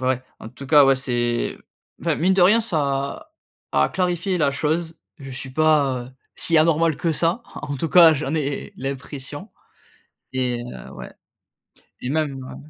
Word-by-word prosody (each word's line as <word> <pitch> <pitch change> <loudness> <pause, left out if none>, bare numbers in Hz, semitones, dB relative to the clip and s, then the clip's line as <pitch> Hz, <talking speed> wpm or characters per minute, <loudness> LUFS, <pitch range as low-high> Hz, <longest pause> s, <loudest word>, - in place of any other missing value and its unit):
ouais, 130 -1 0 0.2
en - - -8
tout 135 +4 -11
cas, 145 +1 +7
ouais, 135 0 +4
c'est, 120 -2 -1 0.4
enfin, - - 0
mine 185 +3 +2
de 190 - +4
rien, 210 +6 +7
ça 140 -9 -2 0.4
a 70 - +3
a - - 0
clarifié 180 0 -1
la 150 -4 +2
chose, 160 +3 -2 0.2
je 135 -1 -9
suis 130 +1 -6
pas, 145 -3 +2
heu, - - -15 0.2
si 165 -1 +2
anormal 160 0 +3
que 165 -2 -1
ça, 170 - 0
en 145 - -5
tout 160 +5 -2
cas, 165 +2 +8
j'en 145 0 -3
ai 145 -3 -3
l'impression. 140 - -7 0.8
Et, 125 -2 -1
heu, 65 - -10
ouais, - - -9 0.9
et 125 - -4
même 155 0 0
heu 130 -1 -9
145 Hz, 170 wpm, -22 LUFS, 130-165 Hz, 0.9 s, cas